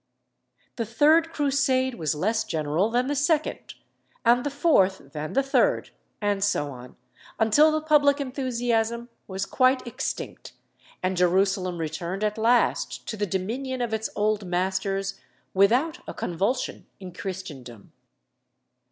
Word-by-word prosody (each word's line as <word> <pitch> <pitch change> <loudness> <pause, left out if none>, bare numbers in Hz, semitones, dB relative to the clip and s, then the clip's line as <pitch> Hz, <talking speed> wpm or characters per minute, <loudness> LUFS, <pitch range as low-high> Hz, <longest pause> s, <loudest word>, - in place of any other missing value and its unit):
The 230 - -1
third 310 +7 +4
Crusade 275 -3 +1
was 155 -9 -2
less 220 +8 0
general 155 +6 0
than 245 +2 +1
the 285 - -1
second, 300 +2 0 0.5
and 240 +1 +5
the 290 - -1
fourth 195 - +2
than 155 +1 -5
the 275 - +3
third, 270 -2 +1 0.3
and 205 -1 0
so 145 -8 0
on, 125 -1 -11 0.4
until 260 +8 +5
the 310 0 -1
public 290 -2 +4
enthusiasm 240 -3 -1 0.2
was 190 0 -3
quite 255 +4 +2
extinct, 240 - -5 0.5
and 185 +1 0
Jerusalem 185 0 +2
returned 170 +5 -4
at 210 +1 -1
last 235 +2 +1
to 220 - -3
the 205 -1 -2
dominion 240 +9 -3
of 240 -2 -2
its 220 0 -1
old 210 0 +1
masters 190 +2 -1 0.3
without 240 +12 +3
a - - -6
convulsion 195 +9 -2
in 185 -2 -9
Christendom. 150 - -8
220 Hz, 135 wpm, -25 LUFS, 185-260 Hz, 0.5 s, and